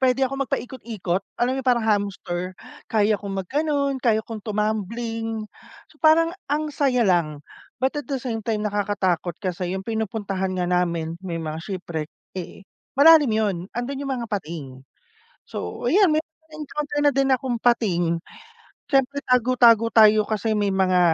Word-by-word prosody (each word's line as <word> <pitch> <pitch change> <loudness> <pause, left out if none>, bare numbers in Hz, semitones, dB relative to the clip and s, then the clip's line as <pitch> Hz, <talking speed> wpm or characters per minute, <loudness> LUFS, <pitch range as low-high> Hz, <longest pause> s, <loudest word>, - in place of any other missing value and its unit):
pwede 260 0 +2
akong 275 +1 -1
mag-paikot-ikot, 220 -8 -3 0.2
alam 250 +2 +1
mo - - -2
yung 265 - -14
parang 240 -2 +3
hamster? 200 -4 -1 0.4
Kaya 215 -1 +2
kong 195 -1 -3
mag-ganon, 280 - 0
kaya 225 -3 +3
kong 225 -2 -7
tumambling, 220 +1 -2 0.4
so - - -23
parang 330 +1 +5 0.2
ang 300 +2 0
saya 265 -4 +2
lang, 170 -6 +1 0.4
but 265 +1 +1
at 290 - -3
the 275 -2 -2
same 225 -4 -4
time, 220 -2 -1
nakakatakot 200 -4 0
kasi 180 -2 -3
yung 190 0 -4
pinupuntahan 205 -4 -2
nga 180 -1 -1
namin, 170 -2 0
may 170 -3 -3
mga 155 -1 -4
shipwreck, 170 -6 -5 0.3
eh, 190 +2 -8 0.2
malalim 295 -3 +7
yun, 215 -4 +1 0.2
andun 265 +4 -4
yung 275 - -2
mga 240 -3 -4
pating. 150 -10 -6 0.6
So, 90 - -5
yan, 380 +4 +5
may 305 - +3 0.3
na-encounter 300 -1 -4
na - - +5
din 275 -1 +2
akong 260 -1 +1
pating, 175 -8 +2 0.7
siyempre, 275 +1 +2
tago-tago 240 -2 +4
tayo, 215 -1 +6
kasi 215 +1 -1
may 205 -1 +1
mga 185 -1 +3
220 Hz, 155 wpm, -23 LUFS, 185-260 Hz, 0.7 s, malalim